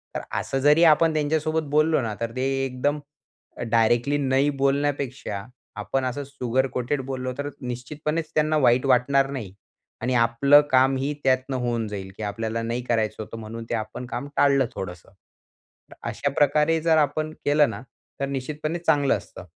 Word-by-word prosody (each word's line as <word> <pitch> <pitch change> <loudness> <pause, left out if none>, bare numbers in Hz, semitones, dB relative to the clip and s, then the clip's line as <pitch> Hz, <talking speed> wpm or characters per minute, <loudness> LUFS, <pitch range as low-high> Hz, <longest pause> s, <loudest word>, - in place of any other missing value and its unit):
तर - - -2 0.2
असं 135 0 -2
जरी 150 +4 +5
आपण 160 0 +5
त्यांच्यासोबत 155 +1 0
बोललो 155 -1 +3
ना 110 -3 -3
तर 115 0 -2
ते 130 - -1 0.2
एकदम 140 +3 -1 0.7
डायरेक्टली 120 +5 +3
नाही 135 +1 +2
बोलण्यापेक्षा, 140 -7 -1 0.3
आपण 135 -1 -2
असं 130 +3 -3
शुगर 130 -1 -1
कोटेड 130 +3 -1
बोललो 130 -1 -4
तर 145 0 -3
निश्चितपणेच 150 +6 -4
त्यांना 155 0 +2
वाईट 125 -2 +3
वाटणार 135 +2 +3
नाही 110 -9 -6 0.5
आणि 125 +2 0
आपलं 120 +5 +5
काम 130 +1 +4
ही 140 +3 -1
त्यातनं 130 0 +1
होऊन 120 -3 -1
जाईल, 95 -2 -6
की 110 - -6
आपल्याला 110 +2 -3
नाही 120 +2 -2
करायचं 110 -2 -1
होतं 115 - -9
म्हणून 115 +1 -7
ते - - 0
आपण 110 +3 -5
काम 140 +2 -5
टाळलं 140 -2 +4
थोडंसं. 90 -2 -7
तर - - -39 0.6
अशा 140 - -2
प्रकारे 150 +3 +3
जर 160 -1 +3
आपण 155 +1 +1
केलं 145 0 +4
ना - - -6 0.4
तर 140 - 0
निश्चितपणे 150 +5 -3
चांगलं 145 -5 +2
असतं. 90 - -12
135 Hz, 160 wpm, -24 LUFS, 120-145 Hz, 0.7 s, जरी